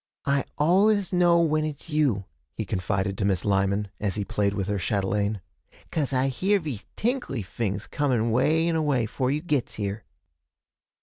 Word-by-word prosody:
'I 140 -1 +1
al'us 195 +5 +3
know 175 -1 +5
when 155 -2 +2
it's 155 +1 -5
you,' 135 -11 +1 0.3
he 110 - -3
confided 95 0 -1
to - - 0
Miss 95 -3 +1
Lyman, 100 +1 +1
as 100 -3 -1
he 105 -1 -2
played 100 +1 0
with 95 -2 -2
her 105 -1 -1
chatelaine, 100 +2 0 0.5
''cause 145 -4 -1
I 130 0 +2
hear 195 +10 +1
vese 145 - -6
tinkly 235 - -1
fings 100 +1 -3
coming 125 -6 0
way 160 +8 +3
and 170 - +1
away, 145 -7 +1
'fore 125 +3 -1
you 150 +3 -1
gits 145 -7 -1
here.' 100 0 -3
125 Hz, 170 wpm, -26 LUFS, 100-155 Hz, 0.5 s, know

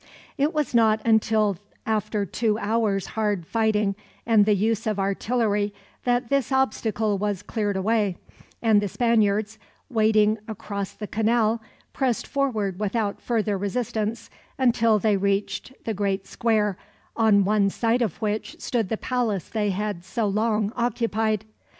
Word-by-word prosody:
It 285 +3 +1
was 300 -4 -1
not 220 -2 +4
until 220 -3 +3 0.3
after 215 -1 0
two 215 +4 0
hours' 215 -3 0
hard 210 -5 -1
fighting, 215 -1 +1 0.3
and 220 -3 +4
the 210 - +4
use 220 +2 0
of 215 -2 0
artillery, 205 +1 0 0.3
that 245 -1 +1
this 275 -2 +1
obstacle 220 -5 +1
was 205 -1 -2
cleared 205 -3 -2
away; 205 -2 +1 0.5
and 220 -3 +5
the 205 - -1
Spaniards, 215 -1 +1 0.3
wading 215 -1 +3
across 205 -2 -5
the 210 - -6
canal, 225 +1 +1 0.3
pressed 255 -4 0
forward 215 -9 -1
without 210 0 -1
further 215 -4 0
resistance, 220 +1 -2 0.3
until 230 -4 +3
they 210 -1 +2
reached 200 +5 -1
the 225 - -1
great 195 -1 -1
square, 210 -3 0 0.4
on 210 -4 +4
one 205 -1 +3
side 230 +4 +1
of 220 -8 -1
which 215 0 -2
stood 230 -7 -1
the 220 - -1
palace 225 -9 -1
they 210 -2 0
had 200 -2 -3
so 220 +5 -2
long 210 +1 0
occupied. 225 -3 0
215 Hz, 140 wpm, -24 LUFS, 205-230 Hz, 0.5 s, and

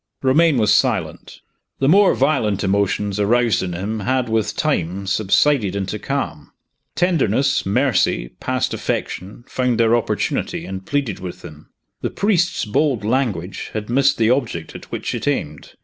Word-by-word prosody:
Romayne 150 +3 +4
was 110 -3 +3
silent. - - -1 0.4
The 135 - +1
more 195 +5 +5
violent 130 -8 +1
emotions 100 +1 0
aroused 115 0 +2
in 90 -1 -3
him 100 +6 -3
had, 125 +3 0
with 110 -1 0
time, 90 +4 -1
subsided 105 +2 +2
into 100 +2 -3
calm. 90 - -4 0.4
Tenderness, 140 - +1
mercy, 105 - +1
past - - -1
affection, 100 +6 -4
found 125 -2 0
their 115 0 +4
opportunity, 120 - -2
and 95 0 -7
pleaded 140 -8 -1
with 90 -1 -8
him. 75 -2 -12 0.3
The - - -1
priest's 180 -4 +1
bold 120 0 0
language 110 -7 -1
had 110 +1 -4
missed 135 +2 +3
the 115 0 +3
object 120 - -2
at - - -10
which - - -3
it - - -4
aimed. 75 -1 -3
110 Hz, 150 wpm, -20 LUFS, 95-135 Hz, 0.4 s, more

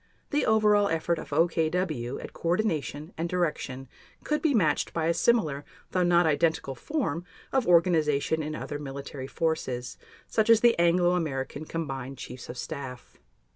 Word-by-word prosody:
The 295 - +1
over 215 -1 +5
all 205 -1 +3
effort 165 +1 0
of - - -8
OKW 160 -4 0
at - - -9
coordination 165 -3 -1
and 170 +1 -1
direction 150 -7 -2 0.4
could 300 0 0
be 300 -5 +2
matched 160 -9 +2
by 165 -1 0
a 170 - +3
similar, 160 -9 +2 0.3
though 185 - +1
not 175 -1 +4
identical 160 -2 +1
form 175 - -2 0.3
of 265 -3 +2
organization 160 -3 +3
in 155 0 -4
other 145 -1 -5
military 140 -1 -6
forces, 135 -6 -2 0.3
such 220 0 0
as 225 -1 +7
the 240 -1 +6
Anglo 175 +1 +4
American 145 -4 -2
Combined 135 -5 -5
Chiefs 125 0 -9
of 125 - -6
Staff. 135 -3 -7
160 Hz, 155 wpm, -28 LUFS, 140-180 Hz, 0.4 s, as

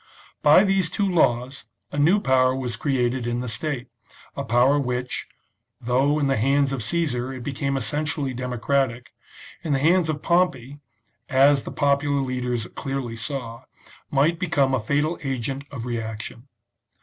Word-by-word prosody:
By 150 +6 +7
these 195 -4 +2
two 205 -2 0
laws 130 - +1 0.3
a 145 - -3
new 170 +8 +4
power 130 -5 +3
was 125 -3 -3
created 125 -1 0
in 120 0 -1
the 125 - -4
state, 125 +3 -3 0.5
a - - -3
power 125 +5 +3
which, 125 -1 -3 0.5
though 130 +5 +1
in 150 - +1
the 135 -1 +1
hands 135 +4 +2
of 130 - -3
Caesar 130 -2 -1
it 130 -1 -7
became 140 +1 -2
essentially 145 +2 -2
democratic, 125 0 -1 0.5
in 160 -4 -1
the - - +3
hands 165 +3 +3
of 150 -1 -3
Pompey, 145 -6 +1 0.5
as 140 0 +4
the - - -5
popular 140 0 +1
leaders 125 -3 -2
clearly 135 -4 -4
saw, 115 0 -6 0.4
might 155 +4 +2
become 140 -7 +1
a 130 - +2
fatal 145 +9 0
agent 135 +1 -3
of 125 -5 -6
reaction. 115 +1 -5
135 Hz, 150 wpm, -24 LUFS, 125-145 Hz, 0.5 s, By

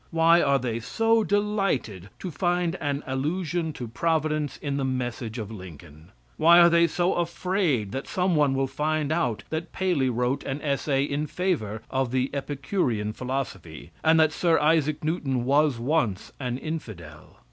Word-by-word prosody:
Why 165 +1 +4
are 140 -1 +3
they 120 -3 -2
so 225 - +2
delighted 195 - -1
to 185 - -6
find 175 +2 0
an 145 -2 -2
allusion 160 +5 -2
to 125 - -6
providence 155 +3 -1
in 140 -2 -3
the 140 - -1
message 125 -3 -3
of 110 -2 -5
Lincoln? 85 -5 -12 0.3
Why 170 +2 +7
are 170 0 +7
they 170 0 +5
so 175 +2 0
afraid 170 - 0
that 135 - -5
some 180 -1 0
one 145 -3 +3
will 135 0 +1
find 150 +2 -1
out 155 -10 0
that 160 +1 -3
Paley 175 -9 +1
wrote 125 +3 -1
an 135 +2 -3
essay 140 -1 0
in 145 +1 -2
favor 140 - -2
of 130 -1 0
the 130 +1 0
Epicurean 135 - -2
philosophy, 110 - -5
and 160 0 +5
that 155 0 +4
Sir 170 -2 +2
Isaac 155 -1 +2
Newton 140 -6 -1
was 145 0 +3
once 120 - -1
an 125 -2 -2
infidel? 110 - -8
145 Hz, 160 wpm, -26 LUFS, 125-165 Hz, 0.3 s, Why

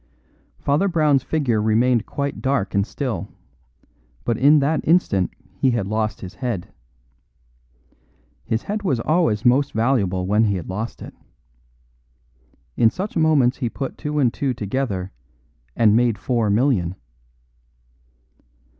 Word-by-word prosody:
Father 145 +8 +1
Brown's 155 -6 +2
figure 130 -7 0
remained 115 +2 +2
quite 140 0 -4
dark 130 -8 0
and 100 +1 +1
still; 115 - -4 1.0
but 120 - +1
in 145 +6 +5
that 150 +2 +1
instant 130 - +2 0.2
he 135 - +1
had 120 -5 0
lost 110 +1 -2
his 95 0 -8
head. 110 -5 -4 1.7
His 110 +1 -2
head 210 +1 -3
was 140 - 0
always 115 -6 +1
most 135 +3 +3
valuable 110 -6 +1
when 105 +4 +3
he 100 -2 +1
had 90 - -5
lost 105 +5 -5
it. - - -10 1.6
In 115 - +4
such 195 - -5
moments 155 -6 +3
he 120 -4 -2
put 135 +3 -5
two 150 -1 -3
and 125 -5 +2
two 135 -3 -2
together 100 -4 -3 0.6
and 110 -2 +4
made 120 -2 +2
four 115 -2 0
million. 100 -6 +1
120 Hz, 130 wpm, -21 LUFS, 105-140 Hz, 1.7 s, in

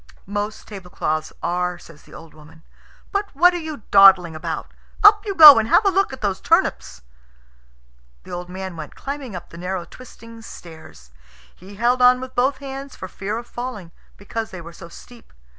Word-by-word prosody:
"Most 205 +2 -5
tablecloths 180 -6 -5
are," 180 0 -2
says 165 -3 -17
the - - -19
old 165 -1 -14
woman. 160 +1 -18 0.5
"But 400 +1 -2
what 355 +5 +5
are 350 - -3
you 310 -8 -8
dawdling 190 -4 +6
about? 160 +1 -6 0.3
Up 415 0 +7
you 395 - -3
go 300 -7 +10
and 220 - -2
have 420 - +4
a 395 - +3
look 390 -2 0
at 265 - -10
those 195 -3 -2
turnips." 65 0 0 1.2
The - - -13
old 175 0 -7
man 190 -1 -7
went 155 -2 -9
climbing 275 -6 -7
up 175 - -9
the 170 - -11
narrow 180 0 -4
twisting 230 0 -14
stairs. 160 - -14 0.4
He 195 +3 -14
held 240 +4 0
on 250 0 +5
with 260 0 -9
both 260 +3 0
hands 275 0 -9
for 185 - -8
fear 200 +4 -5
of 235 - -8
falling, 240 -9 -8 0.3
because 220 +3 -6
they 185 -4 -10
were 170 0 -11
so 170 +1 -13
steep. 240 +7 -16
205 Hz, 185 wpm, -20 LUFS, 175-255 Hz, 1.2 s, go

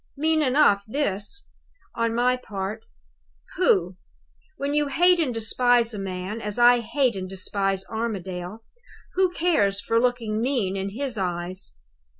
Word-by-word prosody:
Mean 315 +2 +2
enough 255 -8 +4
this, 215 - -2 0.5
on 230 -1 -1
my 250 +1 +3
part. 210 -2 -6 0.7
Pooh! 185 - +2 0.6
When 280 -1 -2
you 295 0 +2
hate 355 +5 +4
and 300 -6 +1
despise 235 +1 +2
a 210 - -5
man, 190 +3 -5
as 210 0 -4
I 240 0 +6
hate 250 0 0
and 185 -1 -5
despise 195 0 -2
Armadale, 200 -2 -5 0.5
who 370 0 +3
cares 315 - +1
for 230 +2 +1
looking 230 -3 0
mean 235 -7 0
in 195 0 -2
his 245 +1 -4
eyes? 180 - -4
225 Hz, 140 wpm, -24 LUFS, 195-260 Hz, 0.7 s, I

